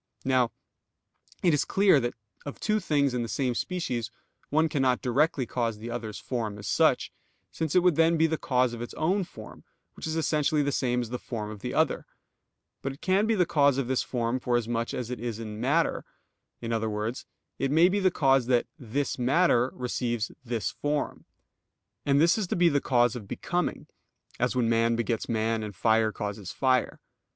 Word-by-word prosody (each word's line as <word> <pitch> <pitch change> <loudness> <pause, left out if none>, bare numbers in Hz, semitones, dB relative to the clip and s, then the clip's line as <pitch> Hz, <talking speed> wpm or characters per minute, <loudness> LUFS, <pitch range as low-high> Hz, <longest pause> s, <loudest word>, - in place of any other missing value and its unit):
Now 130 -3 +3 0.9
it 175 -3 +4
is 145 - +2
clear 195 -6 +4
that 120 -1 -2 0.3
of 145 - -7
two 215 0 +1
things 145 -7 +1
in 125 - -1
the 115 - -3
same 130 -3 0
species 125 - -2 0.4
one 155 +2 +3
cannot 135 -4 +1
directly 135 +1 +1
cause 115 -2 -2
the 115 +3 -7
other's 110 -3 -5
form 110 -5 -3
as 105 - -9
such, - - +2 0.4
since 160 -1 -3
it 180 - +5
would 180 -4 +3
then 165 +1 +4
be 160 - +4
the 160 0 +1
cause 125 -2 +1
of 120 - -6
its 120 - -7
own 185 +5 +1
form, - - -12 0.3
which - - -7
is 160 - -2
essentially 155 -1 +1
the 145 - 0
same 125 -2 0
as 120 -1 -6
the 125 - -3
form 110 -3 -5
of 105 - -9
the - - -5
other; - - +1 0.7
but 135 - -3
it 135 - -16
can 195 +3 +2
be 225 - +2
the 180 -3 +3
cause 140 -4 +3
of 135 -3 -1
this 130 0 +1
form 120 0 -1
for 120 -1 +1
as 115 -2 -2
much 115 0 -2
as 125 -1 -4
it 125 - -4
is 115 -2 -4
in 110 -1 -6
matter 150 +7 +1 0.6
in 115 -1 -3
other 110 -1 0
words, 105 +4 -4 0.3
it 135 - 0
may 160 +5 +5
be 200 +2 +1
the 190 -1 +4
cause 135 -7 +2
that 125 -2 +3
"this 130 +2 -2
matter" 130 -1 +3
receives 120 -2 -2
this 115 -3 -2
form. 145 0 -3 0.8
And 140 0 +4
this 170 +7 +4
is 200 - -1
to - - -1
be 175 -1 +4
the 145 -2 +1
cause 120 -2 +2
of 110 -5 -7
becoming, 180 - -2 0.5
as 125 +1 +1
when 125 -2 +2
man 115 0 +2
begets 115 0 -2
man, 115 0 0
and 105 -2 -6
fire 110 +2 +3
causes 100 -3 -5
fire. 130 -1 +1
125 Hz, 200 wpm, -27 LUFS, 115-150 Hz, 0.9 s, it